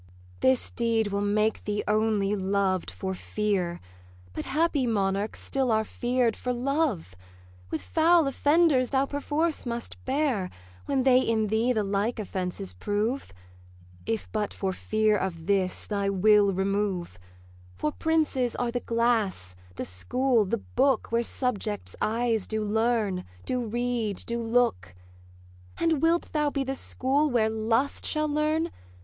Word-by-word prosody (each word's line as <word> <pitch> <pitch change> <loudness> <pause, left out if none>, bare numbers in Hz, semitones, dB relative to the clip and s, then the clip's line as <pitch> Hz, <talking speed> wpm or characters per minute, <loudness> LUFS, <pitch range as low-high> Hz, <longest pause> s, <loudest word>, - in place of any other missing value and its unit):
'This 260 -1 +2
deed 230 -2 +1
will 200 0 -1
make 210 +2 +1
thee 210 0 -2
only 210 -1 +2
loved 190 -1 0
for 190 0 -4
fear; 185 -3 -2 0.5
But - - -4
happy 300 -3 +1
monarchs 200 -1 0
still 265 -2 -1
are 220 0 +3
fear'd 240 0 0
for 250 - -3
love: 250 - -1 0.6
With 160 - -3
foul 330 0 +4
offenders 285 -1 +3
thou 270 0 +2
perforce 295 +3 -1
must 235 -1 -6
bear, 260 -9 0 0.4
When 270 -2 +1
they 255 -1 +6
in 220 -3 +1
thee 225 +4 +2
the 220 -4 +1
like 205 +4 -1
offences 180 - -4
prove: 210 - -2 0.8
If 225 -1 -2
but 210 -2 -2
for 190 -1 -2
fear 215 +2 +1
of 180 -5 -3
this, 190 -1 0
thy 200 -1 -1
will 200 +1 +4
remove; 190 - -1 0.6
For 150 +11 -1
princes 305 - 0
are 245 -1 -1
the 245 - -1
glass, 225 - 0 0.2
the - - -4
school, 230 - +1
the 230 +5 -1
book, 260 +3 0
Where 230 0 +2
subjects 225 -4 -2
eyes 225 -1 0
do 220 -1 -1
learn, 215 -3 0 0.2
do 250 -1 -1
read, 235 -2 -1
do 235 0 -2
look. 225 - +1 0.8
'And 325 -4 +1
wilt 335 +1 +2
thou 300 -1 +2
be 280 -1 -1
the 270 0 -2
school 275 +3 +1
where 225 -4 +2
Lust 225 +5 0
shall 305 0 +1
learn? 305 +3 0
225 Hz, 145 wpm, -27 LUFS, 200-260 Hz, 0.8 s, they